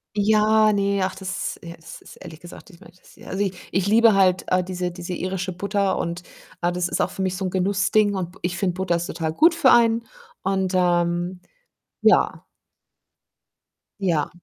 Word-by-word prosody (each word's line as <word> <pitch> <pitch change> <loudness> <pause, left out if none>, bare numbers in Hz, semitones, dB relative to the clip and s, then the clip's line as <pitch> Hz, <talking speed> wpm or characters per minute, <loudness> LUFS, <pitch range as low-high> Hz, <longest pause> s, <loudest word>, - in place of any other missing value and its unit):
Ja, 215 +1 +3
ne, 200 -1 0
ach, 185 0 -2
das 190 -1 -5
ja, 170 0 -9
es 160 - -12
ist - - -14
ehrlich 165 -4 -11
gesagt, 175 +4 -13
ich 170 - -17
meine, 205 - -16
das - - -21
ja. - - -16
Also, 195 +2 -2
ich 195 -2 -2 0.2
ich 190 +1 0
liebe 225 +1 +5
halt, 185 -2 +3
äh, 185 0 +1
diese 180 -1 -4
diese 175 +1 -7
irische 185 +1 -3
Butter 200 +1 -1
und, 170 +1 -4 0.4
äh, 175 0 +1
das 175 0 -1
ist - - -2
auch - - -1
für - - -6
mich 185 -1 -1
so 190 - -3
'n - - -1
Genussding 200 +2 +1
und 180 -2 -4
b 185 - -19
ich 180 +1 -3
finde 190 -3 0
Butter 185 -2 -1
ist 170 0 -2
total 160 -1 -3
gut 325 - +4
für 280 -6 +4
einen 230 -1 +3 0.4
und, 190 -1 -1
ähm 175 0 0 0.6
ja. - - +3 1.6
Ja. 170 -7 0
185 Hz, 195 wpm, -22 LUFS, 175-200 Hz, 1.6 s, liebe